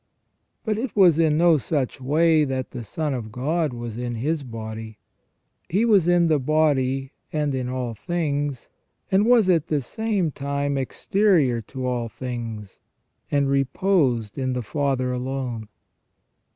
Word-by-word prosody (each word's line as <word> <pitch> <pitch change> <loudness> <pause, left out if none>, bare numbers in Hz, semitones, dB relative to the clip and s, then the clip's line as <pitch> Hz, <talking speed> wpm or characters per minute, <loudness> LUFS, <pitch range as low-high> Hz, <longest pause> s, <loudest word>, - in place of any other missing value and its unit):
But 215 -1 0
it 250 -1 -4
was 180 -6 +5
in 155 -2 +3
no 165 -2 +5
such 135 -2 -2
way 155 +3 +3
that 130 -2 -3
the 120 - -6
Son 150 +7 -3
of 115 -4 -5
God 150 +6 -1
was 120 -1 -6
in 120 -1 -3
His 150 +7 -1
body. 110 -3 -7 0.7
He 205 +7 +2
was 200 -7 +4
in 175 -1 +4
the 155 -3 +3
body, 135 -2 +1 0.2
and 150 -2 0
in 130 -1 -2
all 125 -2 -3
things, 145 -1 -2 0.4
and 195 +3 +4
was 235 -5 +5
at 165 -3 +3
the 150 - +1
same 200 - -1
time 140 0 -2
exterior 140 - +2
to 130 -2 -5
all 120 -2 -1
things, 115 -5 -6 0.5
and 140 -1 +2
reposed 135 - +1
in 130 -1 -1
the 125 -1 -2
Father 135 -1 -1
alone. 125 -3 -3
140 Hz, 150 wpm, -24 LUFS, 125-165 Hz, 0.7 s, was